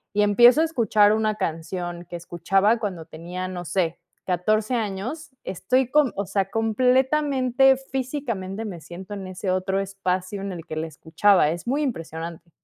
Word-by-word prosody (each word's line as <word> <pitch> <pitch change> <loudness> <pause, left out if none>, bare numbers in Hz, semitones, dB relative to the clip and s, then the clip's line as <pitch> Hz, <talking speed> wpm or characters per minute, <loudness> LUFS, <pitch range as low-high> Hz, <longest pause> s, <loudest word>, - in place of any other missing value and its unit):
y 210 - +3
empiezo 240 +8 +6
a - - +4
escuchar 220 -8 +3
una 215 -1 +1
canción 175 -1 -4
que 175 - -7
escuchaba 195 +6 +1
cuando 185 -7 -4
tenía, 175 +4 -6
no 180 -1 -6
sé, 175 -1 0 0.3
14 215 +6 +1
años, 230 +9 -4
estoy 250 +8 0
com 290 -5 +3
o 200 -1 -3
sea, 195 -1 -1
completamente 260 +3 +3 0.2
físicamente 235 -7 -3
me 180 -5 -6
siento 190 +5 -9
en 195 -1 -6
ese 185 +1 -5
otro 185 +1 0
espacio 195 0 -2
en 200 -1 -4
el 170 -3 -7
que 155 - -5
la 160 +1 -2
escuchaba. 160 +1 +2
Es 170 +1 -4
muy 280 +5 0
impresionante. 165 - -5
195 Hz, 160 wpm, -24 LUFS, 180-240 Hz, 0.3 s, empiezo